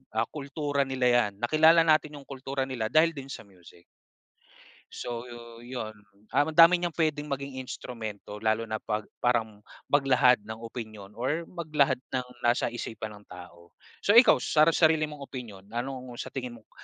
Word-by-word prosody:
ah, 110 +1 +1
kultura 145 0 -2
nila 130 -1 0
'yan. 120 -4 +3
Nakilala 160 +5 +6
natin 155 -2 +2
'yong 140 - -13
kultura 135 0 -3
nila 120 -5 -2
dahil 160 +2 +5
din 135 -1 -8
sa - - -7
music. 90 -2 -18 1.1
So 120 0 -5
yo 120 -1 -10 0.2
'yon, 120 -4 -6 0.3
ah, 145 - +2
madami 165 +3 +7
niyang 175 -1 -3
puwedeng 155 -3 0
maging 140 -2 -5
instrumento, 110 -5 -7
lalo 110 +1 0
na 110 - -1
'pag 105 0 -3
parang 110 -4 -1 0.2
maglahad 135 -3 +4
ng 110 +1 -8
opinyon 110 -3 -9
or 145 +8 -1
maglahad 150 -6 +1 0.2
ng 125 -1 -1 0.2
nasa 120 +1 +2
isipan 110 -3 -6
ng 105 - -19
tao. 85 -1 -13 0.3
So 205 - +5
ikaw 235 +3 +8
sara 155 +1 +3
sarili 160 -2 +3
mong 150 -2 -9
opinyon, 110 -8 -9
anong 125 +1 -5
sa - - -7
tingin 125 -3 -5
mong, - - -39
130 Hz, 165 wpm, -28 LUFS, 110-150 Hz, 1.1 s, ikaw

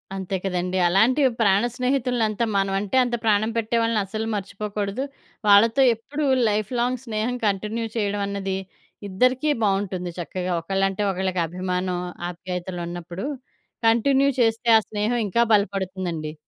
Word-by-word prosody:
అంతే 190 0 -3
కదండీ! 180 0 -1
అలాంటి 225 +11 +3 0.2
ప్రాణ 200 0 +4
స్నేహితులంతా 245 -4 0
మనమంటే, 195 +3 0
అంత 240 -1 -1
ప్రాణం 215 +1 +2
పెట్టే 225 +1 -1
వాళ్ళని 230 -1 +1
అస్సలు 220 +3 -4
మర్చిపోకూడదు. 205 +3 -3 0.4
వాళ్ళతో 225 +6 +6
ఎప్పుడు 290 +6 -4 0.2
లైఫ్‌లాంగ్ 240 +4 -1
స్నేహం 230 +2 -2
కంటిన్యూ 210 +3 -1
చేయడమన్నది 200 -2 -1 0.5
ఇద్దరికీ 255 +9 +2
బావుంటుంది. 195 -3 -1
చక్కగా 180 +1 -3
ఒకళ్ళంటే 195 +3 -1
ఒకళ్ళకి 185 -1 -1
అభిమానం, 180 +1 -2 0.3
ఆప్యాయతలున్నప్పుడు 175 +1 -5 0.6
కంటిన్యూ 270 +5 +4
చేస్తే 225 +1 +1
ఆ - - +5
స్నేహం 215 +3 0
ఇంకా 235 +5 +3
బలపడుతుందండి. 185 -6 -1
205 Hz, 115 wpm, -23 LUFS, 185-230 Hz, 0.6 s, వాళ్ళతో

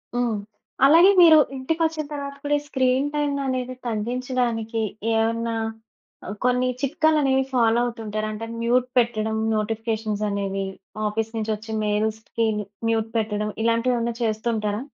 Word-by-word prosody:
హ్మ్. 240 -3 0 0.5
అలాగే 330 +7 +7
మీరు 325 -2 +9 0.2
ఇంటికొచ్చిన 320 +3 -1
తరువాత 280 -1 -5
కూడా, 290 0 0
ఈ - - -12
స్క్రీన్ 260 0 +1
టైమ్‌ననేది 270 -3 -1
తగ్గించడానికి 235 0 -1 0.3
ఏమన్నా 230 +1 0 0.7
ఆహ్, 210 - -5
కొన్ని 250 0 +2
చిట్కాలనేవి 280 -1 +2
ఫాలో 235 -2 +3
అవుతుంటారా? 215 -3 -3
అంటే, 220 +2 -5 0.2
మ్యూట్ 245 +2 +2
పెట్టడం, 220 -2 +1 0.2
నోటిఫికేషన్సనేవి. 215 -3 -2 0.4
ఆఫీసు 220 +1 -2
నుంచొచ్చే 220 0 -3
మెయిల్సిటికి 220 +2 -1 0.4
మ్యూట్ 225 -1 0
పెట్టడం, 210 -1 -1
ఇలాంటివేవన్నా 235 +1 +1
చేస్తుంటారా? 215 -1 -1
230 Hz, 110 wpm, -23 LUFS, 220-255 Hz, 0.7 s, మీరు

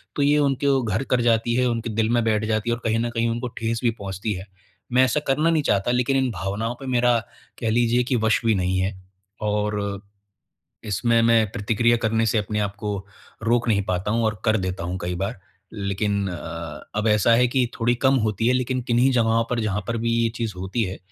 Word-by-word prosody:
तो 145 - -1
ये 145 +1 +4
उनके 140 0 +1
ओ 135 -2 +3
घर 110 +4 -1
कर 125 -2 +1
जाती 115 0 +2
है, 125 0 +2
उनके 115 -1 -2
दिल 110 +1 0
में 120 0 +2
बैठ 110 -1 +1
जाती 110 +1 -1
है 120 - +2
और 120 - -12
कहीं 115 0 +1
न 120 0 -1
कहीं 115 0 0
उनको 120 +2 -2
ठेस 115 0 -1
भी 120 - +4
पहुँचती 100 -1 -4
है। 95 +1 -7 0.5
मैं 130 +1 +6
ऐसा 130 +4 +1
करना 150 +5 +2
नहीं 160 -2 +2
चाहता, 100 -1 +1
लेकिन 125 +2 +1
इन 130 -1 +1
भावनाओं 105 +4 -3
पे 135 - -8
मेरा 120 -1 +3 0.4
कह 115 - -1
लीजिए 120 +1 +2
कि 125 +1 -1
वश 110 - +3
भी 110 -2 +3
नहीं 95 0 0
है, 95 +2 0 0.5
और 105 -1 -1 0.8
इसमें 115 +3 +1
मैं 115 -1 +4
प्रतिक्रिया 115 +3 +2
करने 115 0 +1
से 110 - +2
अपने 105 0 -2
आपको 100 0 -3 0.5
रोक 115 +1 +1
नहीं 100 -2 +2
पाता 90 +2 -2
हूँ 115 +1 +1
और 105 -3 -1
कर 110 0 +3
देता 95 -2 -3
हूँ 90 +2 -3
कई 90 0 -2
बार। 100 +5 -3 0.3
लेकिन 100 0 -1
अ, 85 -3 -7
अब 105 +1 +1
ऐसा 105 +2 +4
है 125 +1 +4
कि 125 -1 +1
थोड़ी 120 +1 +3
कम 135 - +5
होती 110 +2 -1
है, 125 - +4
लेकिन 130 0 0
किन्हीं 120 +2 +4
जगहों 115 -1 +2
पर 120 -1 0
जहाँ 105 -2 -1
पर 115 - -1
भी 115 +1 -1
ये 115 - +2
चीज़ 115 -3 -2
होती 95 +6 -2
है, 95 -3 -4
115 Hz, 225 wpm, -23 LUFS, 105-120 Hz, 0.8 s, मैं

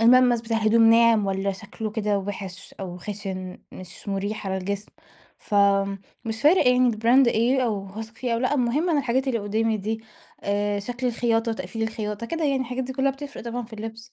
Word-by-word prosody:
الملمس 245 0 +6
بتاع 225 0 -2
الهدوم 225 +1 +5
ناعم 230 -2 +5
والّا 195 0 0
شكله 210 +2 -6
كده 210 -1 0
وِحِش 195 -1 -7
أو 180 -2 -5
خشن 190 -1 -6
مش 185 +3 -11
مريح 200 +2 -3
على 190 0 -1
الجسم. 200 +2 -4 0.5
فمش 200 +3 0
فارق 315 +3 +5
يعني 250 0 +4
الbrand 235 +4 +4
إيه 240 +4 +2
أو 205 -4 -1
هاثق 220 +3 -8
فيه 245 0 -2
أو - - 0
لأ، 255 +4 +1
المهم 280 +6 +1
أنا 310 - +3
الحاجات 265 0 0
اللي 235 - +1
قدّامي 220 +2 0
دي 220 +2 -3 0.4
آآ، 205 0 0
شكل 245 +5 -4
الخياطة، 230 -1 +1
تقفيل 225 0 -5
الخياطة 220 0 -3
كده 330 +4 -2
يعني، 275 -2 +1
الحاجات 255 0 -3
دي 260 - -5
كلّها 270 +1 +1
بتفرّق 280 +1 -8
طبعًا 240 +1 -3
في 225 - -17
اللبس. 225 +2 -8
225 Hz, 185 wpm, -25 LUFS, 200-245 Hz, 0.5 s, الملمس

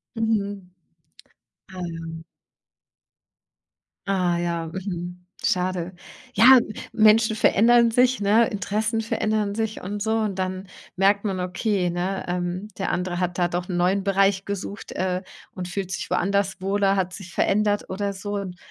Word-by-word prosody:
Mhm, 205 -3 0 1.1
ah 185 -1 -9
ja. 165 0 -7 1.8
Ah 180 -3 +1
ja, 170 -1 -2
mhm, 180 0 -6 0.2
schade. 180 -1 0 0.4
Ja, 255 +2 +9 0.3
Menschen 220 0 +5
verändern 235 +2 +5
sich, 250 +1 +3
ne? 215 +3 +4
Interessen 215 +3 -1
verändern 215 -2 -1
sich 220 -1 -2
und 205 +3 -4
so. 220 +2 0
Und 205 -3 -2
dann 185 0 -3 0.3
merkt 200 +2 +3
man, 190 -2 -1
okay, 180 +1 0
ne, 180 +3 -2
ähm, 180 +2 -2
der 195 - -1
andere 180 0 -2
hat 180 0 -2
da 175 - +3
doch 175 +1 -3
'n 180 - -3
neuen 190 +3 +2
Bereich 195 0 +2
gesucht, 200 +1 -5
äh, 185 0 -2 0.3
und 180 -1 -5
fühlt 190 0 -4
sich - - -3
woanders 195 +1 0
wohler, 195 0 +2
hat 185 -1 -1
sich 190 -2 -9
verändert 205 0 +1
oder 200 +1 -2
so. 205 +2 -5
Und 185 -3 -5
195 Hz, 145 wpm, -24 LUFS, 180-205 Hz, 1.8 s, Ja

